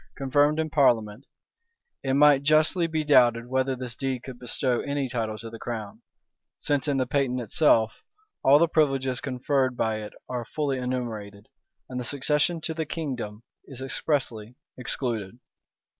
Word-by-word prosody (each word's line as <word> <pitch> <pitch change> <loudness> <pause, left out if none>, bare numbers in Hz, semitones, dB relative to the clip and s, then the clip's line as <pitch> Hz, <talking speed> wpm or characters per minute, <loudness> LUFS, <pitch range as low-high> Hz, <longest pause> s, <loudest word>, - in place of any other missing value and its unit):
confirmed 145 +3 +2
in 160 - 0
parliament, 115 -9 +2 0.7
it 135 -1 0
might 145 -1 +6
justly 155 +4 +3
be 160 -1 -1
doubted 120 -5 +4
whether 130 +1 0
this 125 -2 -6
deed 130 -2 -3
could 130 -2 -9
bestow 125 0 -1
any 140 -1 -2
title 115 -3 -3
to 115 +2 -8
the 115 0 -9
crown: 110 -4 -6 0.6
since 145 0 -1
in 140 -2 +1
the 130 - +1
patent 130 -1 0
itself 115 -1 +2 0.4
all 140 +2 +7
the 170 +3 +4
privileges 135 -5 +1
conferred 130 -1 0
by 110 -1 0
it 105 -1 -7
are 125 -1 -3
fully 140 +1 -2
enumerated, 110 -5 -5 0.4
and 125 -1 -5
the - - -3
succession 150 +5 0
to 160 0 -3
the 160 0 -2
kingdom 130 -9 -5 0.2
is 135 -3 -9
expressly 130 -4 -2 0.2
excluded. 120 -4 -3
130 Hz, 155 wpm, -26 LUFS, 120-145 Hz, 0.7 s, all